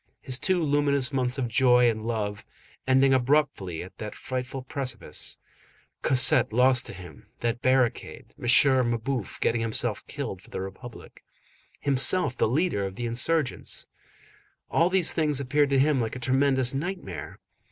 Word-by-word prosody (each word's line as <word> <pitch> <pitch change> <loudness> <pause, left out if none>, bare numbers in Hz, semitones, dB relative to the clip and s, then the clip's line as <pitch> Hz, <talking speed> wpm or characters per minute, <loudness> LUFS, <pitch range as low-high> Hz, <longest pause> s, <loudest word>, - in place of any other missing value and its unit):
His 130 0 -3
two 185 -3 +1
luminous 145 -2 +1
months 130 0 -1
of 130 -3 -1
joy 125 +1 +4
and 110 -2 -1
love, 105 -3 -3 0.4
ending 135 +1 +4
abruptly 130 - 0
at 90 - -14
that 105 -1 -6
frightful 130 +1 -5
precipice, 125 - -4 0.6
Cosette 130 -3 +4
lost 125 +2 +3
to - - -8
him, 90 -5 -12
that 120 +1 -1
barricade, 130 -2 0
M. - - -7 0.4
Mabeuf 120 -1 -3
getting 115 0 +1
himself 115 -1 -1
killed 140 -10 -5
for - - -19
the - - -5
Republic, 95 +6 -10 0.6
himself 140 +1 +2
the - - +1
leader 140 - 0
of 95 -1 -5
the 120 - -4
insurgents,—all 155 +5 -3
these 185 -3 +2
things 150 -4 +1
appeared 140 +2 +1
to 140 - +2
him 140 -1 +3
like 115 +1 -3
a - - -6
tremendous 130 0 +1
nightmare. 140 - -5
130 Hz, 145 wpm, -26 LUFS, 115-140 Hz, 0.6 s, joy